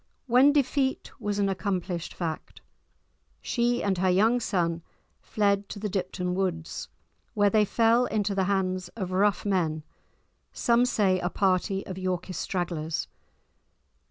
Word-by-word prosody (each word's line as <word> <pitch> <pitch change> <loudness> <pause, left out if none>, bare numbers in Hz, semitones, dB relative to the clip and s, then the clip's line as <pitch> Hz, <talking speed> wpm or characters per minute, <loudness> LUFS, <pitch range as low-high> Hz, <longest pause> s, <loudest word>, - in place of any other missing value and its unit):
When 260 +3 +5
defeat 275 -1 0
was 205 -1 -2
an 200 -1 +2
accomplished 185 -2 -2
fact, 165 -3 -5 0.8
she 240 0 0
and 195 -3 0
her 185 0 +2
young 220 +7 +3
son 170 -7 -1 0.4
fled 200 -1 0
to - - -6
the 210 +1 -3
Dipton 180 -1 -2
Woods, 180 -4 -3 0.5
where 205 -1 +3
they 215 0 +4
fell 230 +4 +3
into 205 -2 -1
the 190 -1 +1
hands 185 -1 0
of 190 -5 -4
rough 195 +1 +2
men, 165 -6 0 0.7
some 240 +1 +2
say 200 -6 +2
a 175 - -1
party 195 0 0
of 185 0 -6
Yorkist 185 -1 -3
stragglers. 170 -4 -2
195 Hz, 135 wpm, -27 LUFS, 180-210 Hz, 0.8 s, When